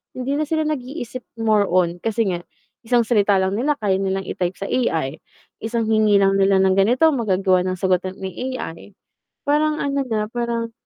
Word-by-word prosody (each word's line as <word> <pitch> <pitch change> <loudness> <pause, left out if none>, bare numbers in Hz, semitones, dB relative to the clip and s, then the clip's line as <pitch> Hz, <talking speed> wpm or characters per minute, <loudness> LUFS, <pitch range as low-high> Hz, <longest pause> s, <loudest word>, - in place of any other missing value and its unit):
hindi 275 +3 -2
na 310 - -1
sila 315 0 0
nag-iisip 260 -3 -4 0.2
more 215 -3 +2
on 175 -1 +1
kasi 225 +2 0
nga, 175 - -2 0.5
isang 240 -1 +3
salita 205 -3 +2
lang 190 0 +1
nila 295 +3 +1
kaya 195 -6 0
nilang 195 0 -1
i-type 180 0 -3
sa 195 - -6
AI 160 - -1 0.4
isang 230 +1 -2
hingi 215 -2 +3
lang 195 0 +3
nila 195 0 +4
ng 190 0 +3
ganito, 250 +10 +4
magagawa 195 -7 +2
ng 185 - -1
sagutan 185 0 0
ni 195 +8 -5
AI 190 -2 -8 0.5
parang 300 +1 +1
ano 280 0 -1
na 215 -2 -1
parang, 235 -1 -2
215 Hz, 175 wpm, -21 LUFS, 190-250 Hz, 0.5 s, nila